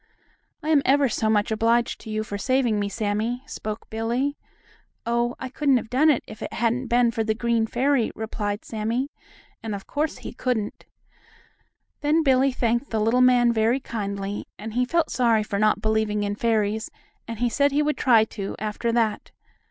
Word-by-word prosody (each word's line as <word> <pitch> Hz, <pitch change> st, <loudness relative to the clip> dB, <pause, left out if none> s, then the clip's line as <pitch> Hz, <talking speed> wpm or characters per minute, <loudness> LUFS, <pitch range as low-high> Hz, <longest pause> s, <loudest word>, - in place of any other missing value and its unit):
"I'm 305 Hz, -2 st, +3 dB
ever 275 Hz, +1 st, +4 dB
so 220 Hz, -2 st, 0 dB
much 210 Hz, 0 st, +2 dB
obliged 230 Hz, +2 st, +1 dB
to -, -, -10 dB
you 215 Hz, 0 st, -1 dB
for 210 Hz, -1 st, -6 dB
saving 250 Hz, -2 st, +1 dB
me, 200 Hz, 0 st, -1 dB
Sammie," 220 Hz, +4 st, -2 dB
spoke 215 Hz, -5 st, -6 dB
Billie. 240 Hz, +6 st, -1 dB, 0.7 s
"Oh, 235 Hz, +1 st, 0 dB
I 260 Hz, -, -4 dB
couldn't 275 Hz, 0 st, +2 dB
have 225 Hz, -, -5 dB
done 285 Hz, +5 st, +4 dB
it 290 Hz, -, +2 dB
if 215 Hz, -, -11 dB
it -, -, -5 dB
hadn't 240 Hz, +2 st, 0 dB
been 240 Hz, 0 st, +3 dB
for 225 Hz, -1 st, -1 dB
the 220 Hz, 0 st, 0 dB
green 230 Hz, -1 st, +1 dB
fairy," 255 Hz, 0 st, +1 dB
replied 210 Hz, -2 st, -4 dB
Sammie, 230 Hz, +6 st, -2 dB, 0.5 s
and 220 Hz, -2 st, -4 dB
of 195 Hz, -, -8 dB
course 300 Hz, +1 st, -2 dB
he -, -, -8 dB
couldn't. 240 Hz, -4 st, -3 dB, 1.1 s
Then 305 Hz, +2 st, +2 dB
Billie 270 Hz, -1 st, +4 dB
thanked 240 Hz, +1 st, 0 dB
the 220 Hz, -, -1 dB
little 225 Hz, +4 st, +3 dB
man 245 Hz, -2 st, +5 dB
very 225 Hz, +4 st, +2 dB
kindly, 200 Hz, -4 st, -4 dB
and 215 Hz, +1 st, -7 dB
he 250 Hz, +2 st, +1 dB
felt 335 Hz, +5 st, 0 dB
sorry 230 Hz, -4 st, +2 dB
for 200 Hz, -1 st, -3 dB
not 215 Hz, 0 st, +2 dB
believing 215 Hz, -1 st, +1 dB
in 205 Hz, 0 st, -1 dB
fairies, 220 Hz, 0 st, 0 dB, 0.4 s
and 230 Hz, -1 st, -5 dB
he 240 Hz, +2 st, +1 dB
said 280 Hz, +4 st, +2 dB
he 295 Hz, +2 st, +2 dB
would 300 Hz, 0 st, 0 dB
try 230 Hz, -4 st, +5 dB
to, 205 Hz, -2 st, -5 dB
after 215 Hz, +2 st, -2 dB
that. 230 Hz, -2 st, 0 dB
230 Hz, 185 wpm, -24 LUFS, 215-255 Hz, 1.1 s, man